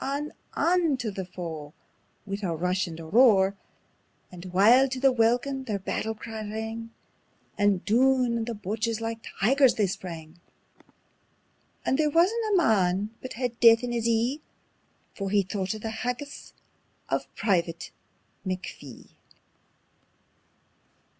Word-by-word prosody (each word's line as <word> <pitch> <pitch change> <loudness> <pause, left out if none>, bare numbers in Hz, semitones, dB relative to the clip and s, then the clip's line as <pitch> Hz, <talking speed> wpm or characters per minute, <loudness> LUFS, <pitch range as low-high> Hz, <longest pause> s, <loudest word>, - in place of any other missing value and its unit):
On, 295 +1 -4 0.2
on 335 -5 +2
tae 235 -4 -3
the 190 -1 -5
foe 160 -5 -7 0.5
wi' 200 0 -4
a 175 -5 -1
rush 180 +3 0
and 165 -1 -8
a 165 - -8
roar! 200 0 +5 0.8
And 180 0 -10
wild 220 +9 +5
to 260 - -4
the 270 0 +5
welkin 250 +3 +1
their 215 -5 -2
battle 220 +3 -3
cry 220 0 -7
rang, 220 +2 -5 0.7
And 205 -2 +1
doon 250 +2 +3
on 230 -1 -1
the 235 -1 -4
Boches 220 +3 -2
like 225 0 -4 0.2
tigers 265 +4 +4
they 210 - +2
sprang: 170 -3 -7 1.5
And 265 - +1
there 305 -1 +3
wisna 345 +8 +3 0.2
a 395 - +4
man 205 - +2
but 255 - -7
had 245 -1 -3
death 230 0 +7
in 245 - -2
his 235 -1 -1
ee, 235 +6 +1 0.7
For 195 -1 -4
he 200 0 +3
thocht 190 +1 -3
o' - - -5
the 220 +1 -5
haggis 250 +4 -5 0.6
o' - - +2 0.2
Private 170 -5 -1 0.5
McPhee. 185 -1 -7
220 Hz, 140 wpm, -27 LUFS, 190-250 Hz, 1.5 s, death